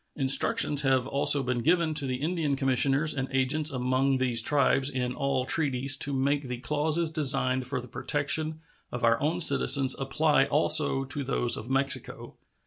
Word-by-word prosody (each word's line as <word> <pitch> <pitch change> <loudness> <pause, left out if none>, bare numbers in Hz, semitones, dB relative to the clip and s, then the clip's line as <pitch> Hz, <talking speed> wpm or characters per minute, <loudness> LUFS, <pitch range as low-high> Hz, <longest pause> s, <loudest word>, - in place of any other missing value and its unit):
Instructions 145 +4 +2
have 130 -2 0
also 140 0 +2
been 125 -1 -3
given 165 +5 0
to 145 -3 +4
the 130 - -3
Indian 155 +1 -3
commissioners 135 +3 +1
and 135 -1 -4
agents 135 +4 0
among 130 0 -1
these 125 -3 -1
tribes 135 +1 0
in 125 -2 -4
all 135 -2 -3
treaties 135 -3 +2
to 145 - +1
make 140 +1 -2
the 125 0 -6
clauses 155 +5 -2
designed 130 -4 +2
for 130 0 -4
the 125 - -11
protection 145 +5 -2 0.3
of 125 - -7
our 115 0 +1
own 160 +4 -2
citizens 140 -3 +3
apply 140 +1 0
also 140 -1 +2
to 140 +2 -3
those 120 -2 0
of 110 - -9
Mexico. 135 +1 -3
135 Hz, 165 wpm, -26 LUFS, 130-150 Hz, 0.3 s, to